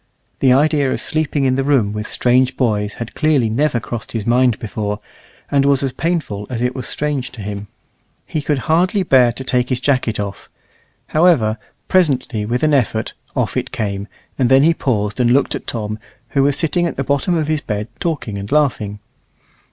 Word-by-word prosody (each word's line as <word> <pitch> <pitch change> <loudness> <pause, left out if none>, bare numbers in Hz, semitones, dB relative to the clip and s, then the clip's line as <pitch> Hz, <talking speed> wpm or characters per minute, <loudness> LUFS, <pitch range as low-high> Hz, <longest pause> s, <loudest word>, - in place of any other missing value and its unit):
The 130 - +4
idea 145 0 +3
of - - -1
sleeping 155 -3 0
in 130 - +3
the 135 +1 0
room 130 -8 +2
with 105 0 -4
strange 125 +1 +2
boys 105 -4 0
had 115 -1 -6
clearly 150 -7 +2
never 125 +2 +1
crossed 110 +1 -6
his 110 -3 -3
mind 120 -1 +3
before, 105 -1 -4 0.5
and 140 -1 +3
was 140 -1 +3
as 135 -2 -1
painful 155 - -2
as 120 -2 -2
it 125 +1 0
was 130 -1 -5
strange 145 -4 -2
to 115 - -8
him. 100 0 -5 0.6
He 155 - -3
could 145 0 0
hardly 180 +5 +2
bear 130 -7 +5
to 130 - -7
take 125 -1 0
his 130 -2 +1
jacket 125 -5 0
off; 100 -2 -5 0.6
however, 150 -10 +3 0.3
presently, 135 - +1
with 125 +4 -1
an 155 -1 +3
effort, 115 -5 +1 0.2
off - - -1
it - - -1
came, 100 -1 -3 0.3
and 125 -2 +3
then 135 +1 +6
he 165 +2 +5
paused 105 -8 -1
and 120 -1 +3
looked 135 +2 +3
at - - -6
Tom, 110 -2 -4 0.3
who 140 - +1
was 140 +1 +3
sitting 175 +1 +1
at 160 - -4
the 135 - 0
bottom 140 +7 +1
of 155 -2 -1
his 155 -1 0
bed 105 -1 -3
talking 140 -12 -2
and 100 +1 -7
laughing. 125 -9 +1
130 Hz, 195 wpm, -18 LUFS, 110-145 Hz, 0.6 s, then